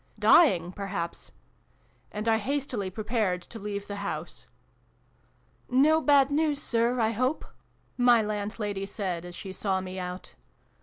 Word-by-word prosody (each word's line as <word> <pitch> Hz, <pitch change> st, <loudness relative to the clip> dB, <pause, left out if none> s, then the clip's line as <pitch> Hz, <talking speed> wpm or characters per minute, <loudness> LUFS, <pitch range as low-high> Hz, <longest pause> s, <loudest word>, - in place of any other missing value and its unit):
" -, -, -35 dB
Dying, 180 Hz, -, +5 dB
perhaps! 195 Hz, -3 st, -5 dB, 0.4 s
" -, -, -37 dB
And 210 Hz, +2 st, -4 dB
I 220 Hz, -1 st, +3 dB
hastily 245 Hz, -4 st, -2 dB
prepared 210 Hz, -3 st, -1 dB
to 225 Hz, -, -10 dB
leave 200 Hz, -1 st, -4 dB
the 205 Hz, 0 st, -6 dB
house. 200 Hz, 0 st, -5 dB, 0.6 s
" -, -, -38 dB, 0.2 s
No 315 Hz, +1 st, +4 dB
bad 285 Hz, -2 st, +4 dB
news, 295 Hz, -1 st, +1 dB
Sir, 235 Hz, 0 st, +1 dB
I 220 Hz, -1 st, +2 dB
hope 255 Hz, +7 st, -1 dB, 0.3 s
?" -, -, -39 dB
my 245 Hz, -1 st, +6 dB
landlady 205 Hz, -1 st, -3 dB
said, 185 Hz, -4 st, -4 dB
as 175 Hz, 0 st, -9 dB
she 190 Hz, -2 st, -7 dB
saw 190 Hz, -1 st, -1 dB
me 185 Hz, 0 st, -6 dB
out. 180 Hz, 0 st, -6 dB
210 Hz, 155 wpm, -28 LUFS, 190-245 Hz, 0.6 s, my